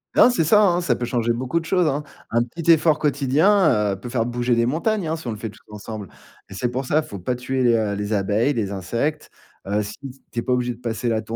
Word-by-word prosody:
Non - - +7
c'est 235 -10 +1
ça 210 +6 +5
hein, 180 -2 +3
ça 130 -8 +1
peut 120 - -3
changer 120 -1 0
beaucoup 130 +7 -1
de 165 - -9
choses, 180 -1 +2
hein. 145 +1 -1 0.3
Un 120 +1 +3
petit 165 +7 +1
effort 155 -1 +4
quotidien, 145 - +3
heu, 95 - -7
peut 120 - -7
faire 120 -2 0
bouger 120 0 0
des 115 0 +2
montagnes 170 - 0
hein, 160 - -1
si 160 -6 -9
on - - -1
le 110 - -5
fait 110 0 -5
tous - - -16
ensemble 105 -1 -7 0.4
et - - -9
c'est 120 +5 -1
pour 130 +2 -3
ça, 155 +4 +2
faut 100 -8 -8
pas 125 +8 -2
tuer 130 +1 -2
les 120 -1 +4
heu 105 -2 0
les 105 +1 -3
abeilles, 105 +7 +1
les 105 -5 -2
insectes. 120 - -2 0.4
Heu, 105 +1 0
si 105 +1 -8 0.3
tu 120 - -2
es - - -1
pas 125 - 0
obligé 125 -1 0
de 115 - -16
passer 120 0 -2
la 110 -1 0
125 Hz, 265 wpm, -22 LUFS, 110-150 Hz, 0.4 s, Non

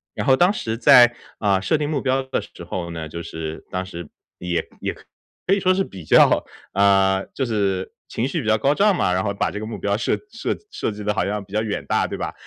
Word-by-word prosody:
然 - - -3
后 130 -2 +6
当 175 +7 +4
时 110 - -3
在， 120 0 +7 0.2
啊， 100 -3 +2
设 100 +11 +1
定 150 -1 -2
目 150 -3 -1
标 135 0 +1
的 130 - -2
时 - - -12
候 85 -2 -4
呢， 80 -2 -5
就 85 +2 -6
是 80 -1 -6
当 95 0 -3
时 85 -4 -8 0.3
也 90 -1 -2
也 - - -2
可 195 - -4
以 200 - -1
说 185 0 +3
是 195 - +1
比 95 - -10
较， - - +5 0.3
呃， 95 -1 +3
就 135 - 0
是 100 -4 -1 0.2
情 120 - -1
绪 160 +3 -2
比 115 - -6
较 110 0 +4
高 140 +7 +2
涨 200 +1 +4
嘛， 90 - +1
然 95 +1 0
后 100 - -1
把 100 - -1
这 105 - -5
个 110 - -5
目 110 - -6
标 100 0 0
设 120 - 0 0.2
设 230 - -2 0.2
设 - - -2
计 105 0 -8
得 105 - 0
好 - - 0
像 105 0 -2
比 95 - -22
较 110 - +1
远 110 -2 -3
大， - - +1
对 - - -5
吧？ - - -4
105 Hz, 270 characters per minute, -22 LUFS, 95-130 Hz, 0.3 s, 在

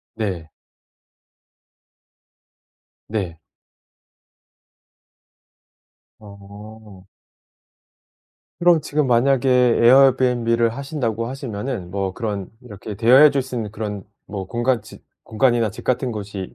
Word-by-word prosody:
네. 95 -8 -4 2.6
네. 95 -7 -4 2.8
어. 100 0 -14 1.6
그럼 170 -2 +4
지금 150 -1 -1
만약에 130 +2 +2
에어비앤비를 125 -1 +4
하신다고 125 -6 -3
하시면은 120 -6 -5
뭐 95 0 -3
그런 100 -4 -4
이렇게 105 -3 -9
대여해 125 +8 +6
줄 140 -1 0
수 130 0 -7
있는 110 -3 -4
그런 105 -2 -5 0.2
뭐 95 -2 -6
공간 120 +2 -1
집 110 - -15 0.2
공간이나 115 0 +1
집 110 - -11
같은 130 0 -1
곳이 100 -3 -7
115 Hz, 190 characters per minute, -21 LUFS, 100-130 Hz, 2.8 s, 대여해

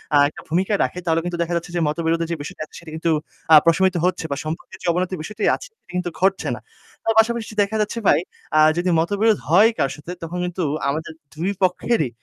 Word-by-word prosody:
আ - - +7
একটা - - -12
ভূমিকা 185 +6 +1
রাখে 180 - -3
তাহলে 165 -1 +2
কিন্তু 175 0 -3
দেখা 170 +1 -4
যাচ্ছে 170 +1 -6
যে 175 - +1
মতবিরোধের 165 +2 0
যে - - 0
বিষয়টা 145 - -8
আছে - - -19
সেটি 170 -2 -11
কিন্তু 165 +1 0 0.4
আ - - +12
প্রশমিত 185 +2 +3
হচ্ছে 180 -2 0
বা 140 - -1
সম্পর্কের 160 +3 -6
যে - - -3
অবনতি 180 +2 -1
বিষয়টি 210 +6 -6
আছে - - -10
সেটি - - -17
কিন্তু 180 -1 -1
ঘটছে 190 +1 +2
না। - - -9 0.4
তার 225 - +2
পাশাপাশি 225 -1 +1
দেখা 200 +2 -4
যাচ্ছে 210 +2 -2
ভাই, 145 - +5 0.4
আ - - +6 0.2
যদি 180 +1 +1
মতবিরোধ 205 +5 +2
হয় 200 +7 +7
কারো 135 -1 +1
সাথে 150 +4 -8
তখন 165 +2 -5
কিন্তু 180 0 -3 0.3
আমাদের 155 +3 -3 0.2
২ 175 +6 -1
পক্ষেরই 180 - +1
175 Hz, 215 wpm, -22 LUFS, 165-195 Hz, 0.4 s, আ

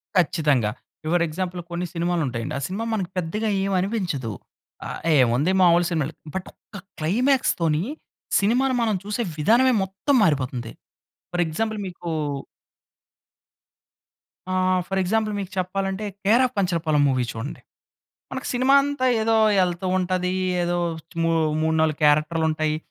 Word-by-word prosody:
కచ్చితంగా. 150 -10 +2 0.3
Your 170 +2 +2
example 180 +2 -4
కొన్ని 175 +1 -2
సినిమాలు 175 0 0
ఉంటాయండి. 115 -2 -4
ఆ - - -7
సినిమా 200 +5 -4
మనకి 190 -5 -2
పెద్దగా 210 +6 -1
ఏమి 195 0 0
అనిపించదు. 180 - -2 0.5
ఆహ్, - - -5 0.2
ఏముంది 130 +8 +2
మాములు 175 -1 +5
సినిమాలు. 160 -2 -1 0.2
బట్ 190 - -3
ఒక్క 205 - -13 0.2
క్లైమాక్స్ 245 - +2
తోని 160 0 +2 0.6
సినిమాని 250 +6 +2
మనం 220 -3 +1
చూసే 210 +4 -2 0.2
విధానమే, 240 - +4
మొత్తం 195 +9 -1
మారిపోతుంది. 130 - 0 0.6
ఫర్ 175 0 +1
ఎగ్జాంపుల్ 215 +7 -2
మీకు 175 -1 -7 2.5
ఆహ్, 185 0 +2
ఫర్ 195 0 -1
ఎగ్జాంపుల్ 215 +3 0
మీకు 195 0 -5
చెప్పాలంటే, 195 +2 -2 0.2
'కేర్ 225 +5 +4
ఆఫ్ 255 - -3
కంచరపాలెం' 165 -6 +1
మూవీ 130 -2 +1
చూడండి. 115 +6 -6 0.7
మనకు 265 - -5
సినిమా 255 +2 +3
అంతా 285 -2 -1 0.2
ఏదో 225 +1 +2 0.3
ఎళ్తూ 180 +1 -2
ఉంటది. 180 0 0 0.3
ఏదో 175 0 0 0.5
మూ 165 - +2 0.3
మూడు, 160 0 +1
4 155 -2 +1
క్యారెక్టర్‌లు 155 +2 +3
ఉంటాయి. 155 0 0
180 Hz, 135 wpm, -23 LUFS, 155-210 Hz, 2.5 s, మాములు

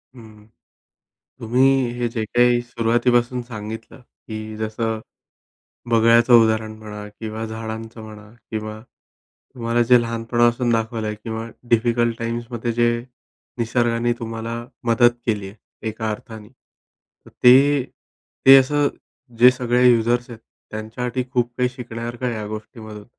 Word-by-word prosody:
हं, 110 -3 -15 0.9
तुम्ही 130 +2 +2
हे 120 - +1
जे 115 -1 -3
काही 120 +2 +3
सुरुवातीपासून 120 +1 +1
सांगितलं 110 +1 -8
की 110 -2 -9
जसं 110 +1 -2 0.9
बगळ्याचं 115 +1 +5
उदाहरण 110 0 -1
म्हणा 105 -1 -8
किंवा 110 +1 -6
झाडांचं 110 +1 -7
म्हणा 110 0 -12 0.2
किंवा 110 0 -5 0.7
तुम्हाला 120 -1 0
जे 125 -1 +8
लहानपणापासून 120 +1 +1
दाखवलं 115 0 -1
आहे 105 0 -3
किंवा 110 -1 -5 0.2
डिफिकल्ट 120 0 +2
टाईम्समध्ये 115 0 -3
जे 120 0 +2 0.7
निसर्गाने 120 0 +1
तुम्हाला 115 0 -5 0.3
मदत 120 +1 +4
केली 105 -4 -1
आहे, 100 - -13 0.3
एका 110 0 -3
अर्थाने. 105 0 -8
तर 130 - -27
ते 135 +3 +6 0.6
ते 135 +1 +11
असं 145 +2 +2 0.5
जे 125 +2 +8
सगळे 125 -1 +1
युजर्स 120 +1 +1
आहेत, 115 - -9 0.3
त्यांच्यासाठी 120 +4 -4
खूप 120 -2 0
काही 125 0 +2
शिकण्यासारखं 120 -1 -6
आहे 120 - -1
या 105 -1 -5
गोष्टीमधून 110 -1 -9
115 Hz, 120 wpm, -21 LUFS, 110-120 Hz, 0.9 s, ते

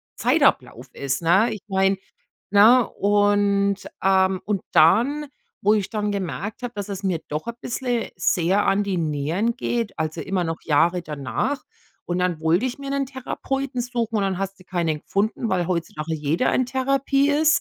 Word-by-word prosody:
Zeitablauf - - +1
ist, 140 +1 -2
ne? 190 +8 +3
Ich 210 - -8
meine, 195 0 +2 0.5
ne? 220 +4 +6
Und, 205 -1 +2 0.3
ähm 190 -1 +3
und 205 -2 -1
dann, 250 - +4 0.4
wo 210 +2 +4
ich 205 -3 -1
dann 210 -2 -1
gemerkt 195 - -4
habe, 245 - -4
dass 205 -1 -5
es 195 -1 -5
mir 185 -5 -1
doch 150 +5 -4
ein 235 - -4
bisschen 245 -2 -2
sehr 185 +4 +2
an 195 +1 +3
die 195 -3 -2
Nieren 165 - -1
geht, 230 -7 -2
also, 155 0 -2
immer 185 -2 -1
noch 165 0 -3
Jahre 170 +4 +2
danach. 150 - -3 0.5
Und 175 +1 -1
dann 180 -3 0
wollte 170 +9 +2
ich 250 - -5
mir 275 -1 -6
'nen 275 -1 0
Therapeuten 270 0 -4
suchen 235 -2 -2
und 205 - +1
dann 190 -2 -1
hast 195 0 -4
du - - -15
keinen 170 -5 -1
gefunden, 215 +6 -1
weil 180 -2 0
heutzutage 165 -2 -3
jeder 155 - 0
in 255 - +2
Therapie 275 +2 +1
ist. 305 +1 +4
200 Hz, 175 wpm, -23 LUFS, 175-240 Hz, 0.5 s, ne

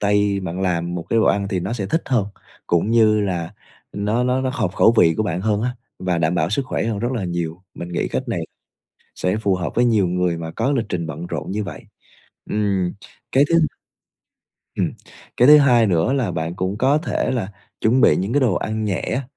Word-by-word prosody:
tay 100 -1 +2
bạn 95 0 -5
làm 85 -2 -1
một 85 - -3
cái 115 - +3
đồ - - +3
ăn 100 0 +1
thì 95 -3 -1
nó 95 +6 -3
sẽ 100 -5 -3
thích 165 - 0
hơn, 120 -7 +1 0.4
cũng 85 +5 +1
như 110 -2 +4
là 90 -5 -3 0.4
nó 105 +5 0
nó 125 +1 +1
nó 130 0 -1
hợp 95 -6 -1
khẩu 115 - +5
vị 80 -2 +5
của 110 - +1
bạn 90 -4 -2
hơn 105 +1 0
á 125 +1 -2 0.2
và 90 -2 -1
đảm 85 +2 +1
bảo 85 0 0
sức 135 +7 0
khỏe - - -2
hơn 110 -3 -2
rất 120 +4 -1
là 110 -7 -2
nhiều, 85 0 -4
mình 85 - -7
nghĩ 85 - -2
cách 130 - -3
này 90 -8 -2 0.7
sẽ 90 +3 -1
phù 100 -3 +1
hợp 90 -1 -3
với 120 - +3
nhiều 105 -6 +3
người 90 -1 0
mà 80 -1 -5
có 125 - 0
lịch 115 -6 0
trình 85 -4 -2
bận 80 +3 -6
rộn 80 -2 -5
như 105 +2 -2
vậy. - - -8 0.7
Ừm, 100 -4 0 0.4
cái 135 +2 +5
thứ 170 - +3 1.2
ừm, - - 0 0.4
cái 125 +3 +5
thứ 150 0 +10
hai 120 -5 +5
nữa 90 +6 +2
là 125 -9 0
bạn 80 +1 -3
cũng 95 +3 -3
có 135 +5 +3
thể 160 - -2
là 110 -6 -2 0.3
chuẩn 120 +4 +3
bị - - +5
những 100 +5 -2
cái 145 - +3
đồ 120 -8 +2
ăn 110 +3 -2
nhẹ 100 -4 -1
á, 135 - -2
100 Hz, 230 wpm, -21 LUFS, 90-115 Hz, 1.2 s, thứ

